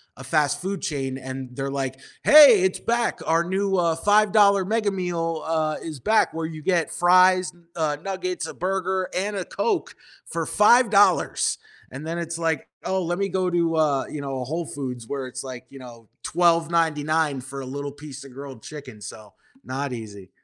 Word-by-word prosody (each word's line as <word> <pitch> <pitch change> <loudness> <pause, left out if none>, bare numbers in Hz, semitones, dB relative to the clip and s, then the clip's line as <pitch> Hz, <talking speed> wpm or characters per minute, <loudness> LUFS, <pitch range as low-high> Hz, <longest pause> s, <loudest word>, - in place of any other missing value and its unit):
a 135 - -11
fast 145 +1 +1
food 190 +1 -3
chain, 135 -3 -3
and 130 -1 -7
they're 135 +1 -3
like, 135 -1 -3 0.3
"Hey, 285 -9 +9
it's 190 0 +1
back, 235 0 0
our 165 +1 +2
new, 195 +2 -1
uh, 170 -2 +2
$5 205 +1 +4
mega 215 +1 0
meal, 170 -4 -2
uh, 155 -1 -1
is 155 -4 -7
back 220 - +2
where 165 0 -2
you 160 -1 -7
get 170 0 0
fries, 185 +1 +4 0.2
uh, 155 -3 -1
nuggets, 185 -2 -3
a - - -7
burger, 190 0 -2
and 205 +2 -2
a 190 - -2
Coke 425 -6 -2 0.4
for 165 -1 -2
$5." 210 -2 +4 0.3
And 135 +4 -8
then 165 +1 -3
it's 170 0 -4
like, 160 -4 -1 0.2
oh, 190 -1 0
let 175 +2 -2
me 200 0 0
go 185 -1 0
to, 170 -1 +1
uh, 150 -4 +2
you 150 - -6
know, 135 -2 -4
a - - -2
Whole 165 +5 -3
Foods 125 -6 -6
where 135 0 -4
it's 130 +1 -7
like, 130 -2 -8
you 140 - -12
know, 115 -4 -13
$12.99 160 -3 +1
for 135 +2 -7
a - - -7
little 140 +2 -5
piece 145 -1 -10
of 135 - -13
grilled 135 -3 -9
chicken, 135 -8 -10
so, 105 +1 -10 0.3
not 135 0 -4
easy. 105 -5 -9
160 Hz, 185 wpm, -24 LUFS, 135-185 Hz, 0.4 s, Hey